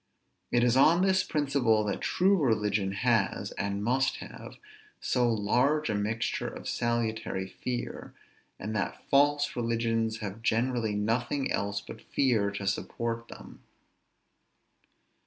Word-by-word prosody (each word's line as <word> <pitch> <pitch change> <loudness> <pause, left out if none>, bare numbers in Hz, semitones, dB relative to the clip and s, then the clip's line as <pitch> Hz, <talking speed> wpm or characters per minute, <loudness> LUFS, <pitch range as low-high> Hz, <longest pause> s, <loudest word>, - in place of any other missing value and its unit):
It 120 -1 +3
is 120 0 +3
on 165 +7 +5
this 190 -1 +3
principle 135 -7 +1
that 100 -2 -2
true 190 +2 +3
religion 105 - +1
has, 115 0 +1
and 100 0 -3
must 130 +4 +1
have, - - -10 0.4
so 125 -2 +1
large 125 +8 +1
a - - 0
mixture 105 +2 -1
of - - -7
salutary 110 -5 -1
fear; 120 +5 -5 0.5
and 110 +3 -5
that 105 - -3
false 145 +1 +3
religions 115 -1 0
have 105 0 -6
generally 115 -1 0
nothing 120 +6 0
else 100 0 -1
but 110 - -10
fear 115 -7 +1
to 100 0 -5
support 115 +4 -2
them. - - -12
115 Hz, 125 wpm, -29 LUFS, 105-130 Hz, 0.5 s, on